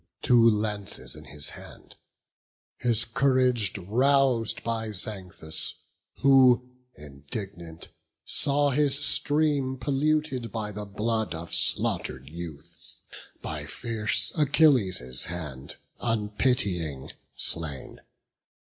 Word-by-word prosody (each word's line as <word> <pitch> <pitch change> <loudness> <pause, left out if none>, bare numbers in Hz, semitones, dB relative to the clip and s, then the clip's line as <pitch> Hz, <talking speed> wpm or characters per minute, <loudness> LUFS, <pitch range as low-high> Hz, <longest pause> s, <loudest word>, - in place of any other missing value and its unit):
Two 120 -2 +5
lances 105 - -2
in 75 0 -12
his 75 0 -4
hand; - - -13 0.8
his 120 -1 +1
courage 125 -4 +1
rous'd 125 +4 +1
By 115 -1 -2
Xanthus, 90 -6 -4 0.5
who, 130 -2 +5 0.2
indignant, 80 +4 -8 0.4
saw 145 0 +2
his 140 0 +2
stream 145 -2 +1
Polluted 140 -1 -1
by 110 -2 -4
the 105 0 -6
blood 110 0 -2
of 85 +1 -7
slaughter'd 65 +1 +3
youths, 85 0 -4 0.4
By - - -5
fierce 110 -2 -1
Achilles' 125 - +2
hand, 75 -6 -6 0.2
unpitying, 105 - -1 0.2
slain. 80 -5 +2
110 Hz, 90 wpm, -26 LUFS, 85-130 Hz, 0.8 s, Two